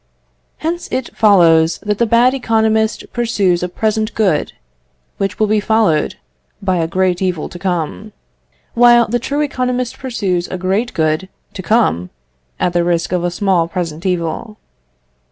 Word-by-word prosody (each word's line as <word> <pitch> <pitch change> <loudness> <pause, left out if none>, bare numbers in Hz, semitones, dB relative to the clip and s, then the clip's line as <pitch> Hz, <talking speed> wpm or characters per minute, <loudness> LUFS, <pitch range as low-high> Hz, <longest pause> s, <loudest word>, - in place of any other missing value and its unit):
Hence 340 +2 -3
it 260 -2 -3
follows 170 -6 +4
that 210 -1 -1
the 235 - +2
bad 240 +3 +4
economist 220 -3 +1
pursues 205 -7 +1
a 180 - -1
small 180 - -20
present 220 0 0
good, 190 -9 +1 0.6
which 195 0 -2
will 215 - +2
be 215 0 +2
followed 210 -8 +1 0.4
by 190 -3 0
a 165 -1 0
great 185 +1 0
evil 180 -4 -1
to 175 - -10
come, 180 +3 -3 0.6
while 240 0 +5
the 240 +3 0
true 285 +5 -2
economist 250 -3 -2
pursues 195 -9 -2
a 185 - -5
great 195 +7 -1
good 155 +3 0 0.2
to 190 - -6
come, 165 - +1 0.5
at 175 - 0
the 175 0 +2
risk 170 -1 0
of 180 -1 0
a 175 - +1
small 175 -2 +1
present 170 -2 -4
evil. 180 +4 -3
195 Hz, 155 wpm, -16 LUFS, 175-225 Hz, 0.6 s, while